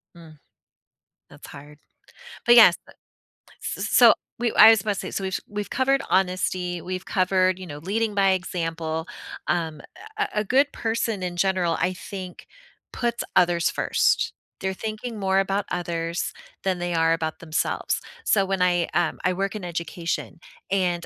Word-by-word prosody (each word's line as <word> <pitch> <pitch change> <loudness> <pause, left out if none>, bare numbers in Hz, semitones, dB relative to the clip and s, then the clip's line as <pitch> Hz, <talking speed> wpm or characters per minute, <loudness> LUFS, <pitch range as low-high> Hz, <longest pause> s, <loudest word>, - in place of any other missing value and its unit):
Mm, 160 -2 -14 0.9
that's - - -13
hard. 145 +1 -12 0.7
But 240 - +8
yes. 220 -7 +8
Uh. - - -14 0.7
S - - -4
s - - -2
so - - +7 0.3
we 235 -1 +1
I 215 - +10
was 225 -1 +6
supposed 200 0 -2
to - - -6
so, 195 - -3
which 190 0 -2
we've 205 0 -5
covered 270 +1 +1
honesty, 180 -1 0
we've 185 +2 -5
covered, 185 -1 +2
you 185 - -7
know, 145 -4 -8
leading 210 +6 -1
by 195 -1 +3
example. 165 -3 -3 0.4
Um, 160 -4 -1 0.4
a 420 0 +1
a 210 - +1
good 270 +7 +2
person 225 -3 -2
in 175 -1 -4
general, 185 -2 +1
I 180 +2 +1
think, 185 -1 -8 0.5
puts 235 -1 -2
others 175 -1 +3
first. - - +1 0.3
They're 190 0 -2
thinking 220 +2 -5
more 190 0 +2
about 195 +1 0
others 170 -1 -3 0.3
than 185 -2 0
they 175 0 -2
are 165 0 +3
about 160 -1 -2
themselves, 165 0 -1 0.2
so, 200 - +3
when 195 0 -2
I, 175 -1 +2
um 175 +1 +1
I 185 - +2
work 195 +3 -2
in 210 - -6
education 170 -1 -4 0.3
and 180 -3 0
185 Hz, 160 wpm, -24 LUFS, 170-200 Hz, 0.9 s, I